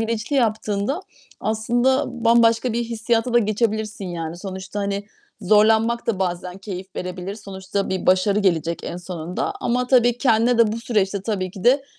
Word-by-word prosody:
bilinçli 225 +4 -1
yaptığında, 220 - 0 0.4
aslında, 240 +5 +1 0.2
bambaşka 230 +1 +4
bir 235 +1 -1
hissiyata 230 +1 -1
da - - +7
geçebilirsin 215 -1 -1
yani. 165 -1 -5
Sonuçta, 190 +2 -6
hani, 200 0 -2 0.4
zorlanmak 220 +4 +3
da 215 -5 0
bazen 180 0 -3
keyif 195 -1 -8
verebilir. 180 +2 -5
Sonuçta 195 -1 -4
bir 190 -1 -2
başarı 190 +2 +3
gelecek 170 -4 0
en 175 - -5
sonunda 175 -1 -4
ama 250 +1 0
tabii, 245 -1 +4
kendine 235 -1 +3
de 225 -2 +4
bu 225 - -3
süreçte 205 -4 0
tabii 195 -3 -2
ki 190 0 -10
de 270 +3 +4
210 Hz, 155 wpm, -22 LUFS, 190-230 Hz, 0.4 s, da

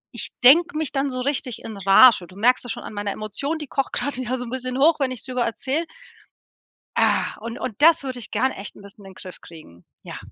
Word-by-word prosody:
ich - - -4
denke 320 +5 +6
mich 310 -3 -2
dann 275 0 0
so 255 - -4
richtig 255 -3 -3
in 220 - -7
Rage. 195 0 +6
Du 185 - -17
merkst 250 +4 +3
das 245 - -5
schon - - -6
an - - -9
meiner 205 0 -3
Emotion, 245 +11 -4
die 300 - -6
kocht 275 +1 -2
grad 285 - -2
wieder 255 0 -3
so 245 - -6
'n - - -8
bisschen 255 0 -4
hoch, 305 +4 +4
wenn 260 - +1
ich 255 - -8
drüber 255 -2 -2
erzähle. 275 +8 -2 1.1
Ah! - - +1
Und 230 0 -7
und 240 +1 -6
das 325 -2 +5
würde 255 -2 -5
ich 235 - -8
gern 260 +1 +1
echt 200 - -8
'n - - -14
bisschen 200 +1 -15
in 195 - -11
den - - -28
Griff 185 - -11
kriegen, 120 - -15 0.2
ja. - - -8
255 Hz, 245 wpm, -22 LUFS, 215-275 Hz, 1.1 s, denke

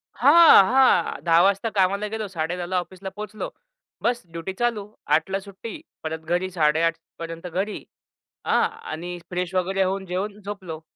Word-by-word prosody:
हां, 310 -3 +8
हां. 255 -6 +3
10:00 170 0 +5
वाजता 200 +4 +2
कामाला 200 +2 +2
गेलो. 220 -1 -3
10:30ला 175 +1 -3
ऑफिसला 185 +2 -9
पोहचलो. 210 0 -5 0.5
बस 240 0 +1
ड्युटी 170 +3 -5
चालू. 225 -1 -1 0.2
8:00 160 +4 +2
ला 195 - 0
सुट्टी, 200 - -9 0.2
परत 160 0 -3 0.2
घरी 185 +1 -1
8:30 160 +2 +2 0.2
पर्यंत 165 +1 -6
घरी. 190 +5 -3 0.6
आ, - - +1
आणि 175 +3 -7
फ्रेश 180 0 -3
वगैरे 190 +1 +1
होऊन 190 +1 -1
जेवण 200 +3 -3
झोपलो. 190 -6 -7
190 Hz, 150 wpm, -24 LUFS, 170-205 Hz, 0.6 s, हां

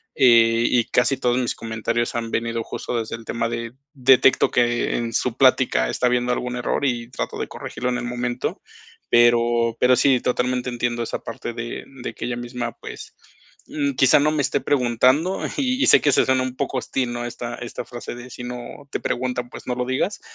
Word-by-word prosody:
Eh, 115 -2 +5
y 120 -2 +2
casi 125 +2 +2
todos 120 0 +1
mis 125 -2 0
comentarios 115 +1 -2
han 115 -1 -3
venido 115 0 -1
justo 120 - -4
desde 110 0 -4
el 115 - -14
tema 115 0 -1
de, 115 0 -4 0.2
detecto 130 -1 +4
que 120 -1 +1
en 115 -1 -3
su 120 +1 -1
plática 130 - +3
está 125 - +1
habiendo 125 0 +1
algún 125 0 -3
error, 125 - -1
y 120 -2 -1
trato - - -4
de - - -3
corregirlo 125 - -5
en 125 - -1
el 120 - -5
momento. 120 0 -3 0.5
Pero 120 -1 +4
pero 125 0 +5
sí, 130 -3 +3
totalmente 125 0 0
entiendo 120 0 -1
esa - - -4
parte 115 +1 -6
de 120 0 -5 0.2
de - - -5
que - - -5
ella 120 -1 -3
misma, 120 -1 -4
pues, - - -10 0.5
mm, 140 -2 -1
quizá, 135 +2 +5
no 150 +2 +3
me 155 -1 0
esté - - 0
preguntando. 130 +6 +2 0.2
Y 260 0 +1
y - - +3
sé - - +7
que 145 - +3
se - - +4
suena 130 0 +2
un 130 -1 -4
poco 135 0 -2
hostil, 125 -1 -2
¿no?, 120 0 -4
esta 120 0 -5
esta 120 -1 -7
frase 120 0 -7
de: 120 +1 -10
"Si 120 - -8
no 125 +3 -8
te - - -2
pregunta, 125 0 -2
pues, - - -11
no 125 - 0
lo 125 0 -2
digas". 130 +10 -1
120 Hz, 205 wpm, -22 LUFS, 120-130 Hz, 0.5 s, sé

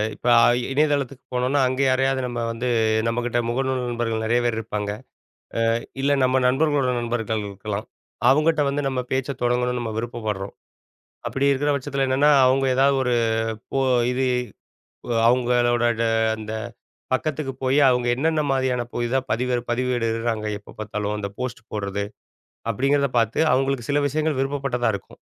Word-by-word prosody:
இப்ப - - -7
அ - - +5 0.3
இணையதளத்துக்கு 140 -3 0
போனோனா 125 +3 +1
அங்கே 130 +2 0
யாரையாவது 135 0 +1
நம்ம 120 -1 -4
வந்து 115 +2 -3 0.4
நம்மக்கிட்ட 120 +1 0
முகநூல் 130 +1 -1
நண்பர்கள் 115 -2 -2
நெறைய 120 +2 +2
பேர் 120 -2 0
இருப்பாங்க. 105 -2 -3 0.8
அ - - +1 0.3
இல்ல 140 +1 +2
நம்ம 130 +1 +3
நண்பர்களோட 140 0 +2
நண்பர்கள் 115 -2 -2
இருக்கலாம். 100 +1 -5 0.4
அவுங்கட்ட 155 +2 +3
வந்து 145 +1 -1
நம்ம 130 -1 -1
பேச்சை 135 +1 -1
தொடங்கணும்னு 125 0 +1
நம்ம 115 -2 -3
விருப்பப்பட்றோம். 110 -4 -4 0.7
அப்படி 140 +1 +1
இருக்கிற 145 +2 +1
பட்சத்தில 140 0 -1
என்னன்னா, 140 +3 +4
அவுங்க 135 +1 +3
ஏதாவது 135 +1 +3
ஒரு 125 -1 +1 0.6
போ 135 - +1 0.3
இது 130 +1 0 0.9
அ - - 0
அவுங்களோட 120 -1 +2 0.2
ட - - +2 0.3
அந்த 110 0 -7 0.6
பக்கத்துக்கு 145 0 -2
போய் 130 +2 +3
அவுங்க 125 -1 +1
என்னென்ன 160 +3 +1
மாரியான 130 -2 +1
புதிதா 120 +2 0
பதிவேடு 125 +1 0
பதிவிடுறாங்க 115 -3 -1
எப்ப 100 - -15
பார்த்தாலும் 105 -1 -3
அந்த 100 - -3
போஸ்ட் 125 -2 -4
போடுறது, 100 -1 -2 0.7
அப்பிடிங்கிறத 140 +3 +1
பார்த்து 115 -1 0
அவுங்களுக்கு 135 -2 0
சில 145 - +2
விஷயங்கள் 155 0 -1
விருப்பப்பட்டதா 135 -3 -1
இருக்கும். 100 - -9
125 Hz, 140 wpm, -23 LUFS, 115-135 Hz, 0.9 s, அ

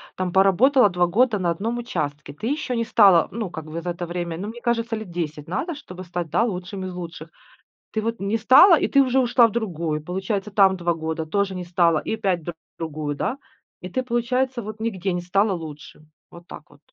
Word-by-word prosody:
там 185 -2 -3
поработала 205 +6 +5
2 180 -1 +2
года 220 +5 +2
на 175 -3 0
одном 220 +8 -2
участке, 150 - -4
ты 180 +10 -5
еще 285 -2 -2
не 230 - 0
стала, 195 -7 +5
ну 215 -5 -4
как 160 -3 -7
бы 160 +2 -6
за 175 +1 -3
это 175 0 -5
время, 175 -1 -4
ну 205 - -4
мне 230 +2 -7
кажется, 235 -1 0
лет 215 -4 -7
10 155 -3 -4
надо, 300 - -3
чтобы 185 -10 -10
стать, 175 -2 -5
да, - - +3
лучшим 190 -3 -4
из 185 - -6
лучших. 170 -2 -8 0.6
Ты 220 - -1
вот 230 0 -3
не 200 +3 0
стала, 280 - +7
и - - +1
ты 275 - +4
уже 260 0 +2
ушла 240 -1 +5
в - - -7
другую, 170 -9 -2
получается 190 +5 -3
там 195 -2 +4
2 175 -1 0
года, 160 0 -4
тоже 200 +4 -1
не 180 -1 -5
стала 170 -2 +2
и - - -3
опять 190 -5 -1
в 175 - -3 0.3
другую, 155 -2 -4
да. 245 - -2 0.4
И 180 - -7
ты 255 - -1
получается 250 +1 -1
вот 215 +1 -8
нигде 195 -4 -2
не 175 - -2
стала 195 +4 +1
лучшим. 155 -3 -8 0.2
Вот 175 0 -14
так - - -11
вот. - - -20
190 Hz, 220 wpm, -23 LUFS, 170-230 Hz, 0.6 s, стала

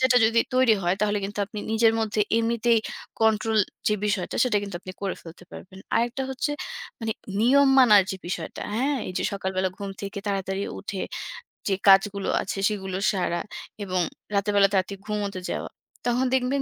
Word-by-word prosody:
সেটা 260 -1 +4
যদি 230 +1 +4
তৈরি 255 -3 +5
হয় 175 +1 +2
তাহলে 210 0 +1
কিন্তু 205 +1 -6
আপনি 210 - -8
নিজের 225 0 +4
মধ্যে 220 -1 -1 0.2
এমনিতেই 230 0 +2 0.4
control 220 0 +3 0.3
যে 210 - +2
বিষয়টা 205 -4 -1
সেটা 240 -4 +1
কিন্তু 200 -3 -5
আপনি 185 - -8
করে 195 - -1
ফেলতে 170 +1 -12
পারবেন। 190 +1 -11 0.2
আরেকটা 240 +3 +1
হচ্ছে 265 +3 -2 0.5
মানে 225 -1 -1 0.3
নিয়ম 275 +4 +5
মানার 215 -6 +8
যে 190 - -3
বিষয়টা, 175 -2 -5
হ্যাঁ? 275 +5 +1
এই 185 - -5
যে - - -2
সকালবেলা 190 -1 -1
ঘুম 200 -1 -5
থেকে 200 0 -5
তাড়াতাড়ি 195 -1 -1 0.2
উঠে 200 -1 -5 0.7
যে 195 - +2
কাজগুলো 195 0 +5
আছে 195 - -4
সেগুলো 190 -3 -3
সারা 175 -3 -1 0.4
এবং 185 -2 0 0.3
রাতেরবেলা 200 0 +4
তাড়াতাড়ি 195 +1 0
ঘুমোতে 205 -3 -2
যাওয়া। - - -3 0.4
তখন 245 +1 +2
দেখবেন 265 +2 +1
205 Hz, 165 wpm, -25 LUFS, 195-230 Hz, 0.7 s, মানার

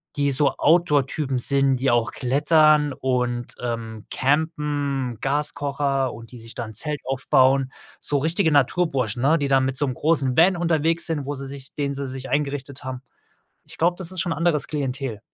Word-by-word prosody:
die 140 -1 +1
so 140 +1 +3
Outdoor-Typen 150 -4 +2
sind, 135 +1 +3
die 130 +2 +1
auch 120 -1 +1
klettern 150 +2 +3
und, 125 -3 -1
ähm, 115 -3 -5
Campen, 145 -3 -1
Gaskocher 140 -1 -1
und 115 +1 -12
die 125 - -10
sich 115 +1 -11
da - - -4
'n 110 - -10
Zelt 150 +4 -3
aufbauen, 130 0 +2 0.3
so 145 - 0
richtige 160 +3 +1
Naturburschen, 135 -5 +1
ne? 155 +5 +4
Die 140 -2 -2
da 135 0 +5
mit 130 0 -1
so 145 - +1
'nem 130 -2 -3
großen 145 -5 +1
Van 180 +3 +5
unterwegs 165 -1 +1
sind, 150 -4 -2
wo 145 +1 -3
sie 135 +1 -7
sich 135 -1 -10
den 140 -1 -2
sie 140 0 -4
sich 130 0 -7
eingerichtet 140 0 -2
haben. 130 -1 -5 0.6
Ich - - -10
glaube, 175 +2 +2
das 185 0 -4
ist 185 - -2
schon 175 - -1
'n - - -3
anderes 165 -4 +1
Klientel. 135 -6 -3
140 Hz, 185 wpm, -23 LUFS, 130-150 Hz, 0.6 s, da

